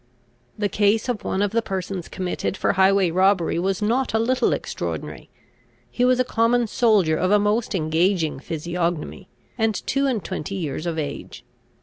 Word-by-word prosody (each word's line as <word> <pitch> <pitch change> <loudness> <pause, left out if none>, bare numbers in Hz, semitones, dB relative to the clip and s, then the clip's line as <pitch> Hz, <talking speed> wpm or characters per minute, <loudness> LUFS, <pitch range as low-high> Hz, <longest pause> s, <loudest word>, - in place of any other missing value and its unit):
] 120 0 -39
The 205 - 0
case 205 +4 +1
of 240 -4 -2
one 190 - 0
of 205 - 0
the 230 +1 +1
persons 190 -3 -4
committed 185 +1 -3
for - - +1
highway 190 -2 +3
robbery 185 -1 +2
was 190 +2 -1
not 240 +3 0
a - - +3
little 250 +3 +1
extraordinary. - - -4 0.6
He 245 - -1
was 250 0 +3
a - - +4
common 235 0 +2
soldier 210 -8 +2
of 185 +3 0
a 210 - +5
most 210 +2 0
engaging 165 -1 +1
physiognomy, 170 +4 -3 0.3
and 220 -1 +1
two 275 0 +1
and 235 -7 -1
twenty 195 +1 -4
years 160 -2 -4
of 165 -1 -2
age. 145 -2 -6
195 Hz, 175 wpm, -23 LUFS, 175-225 Hz, 0.6 s, a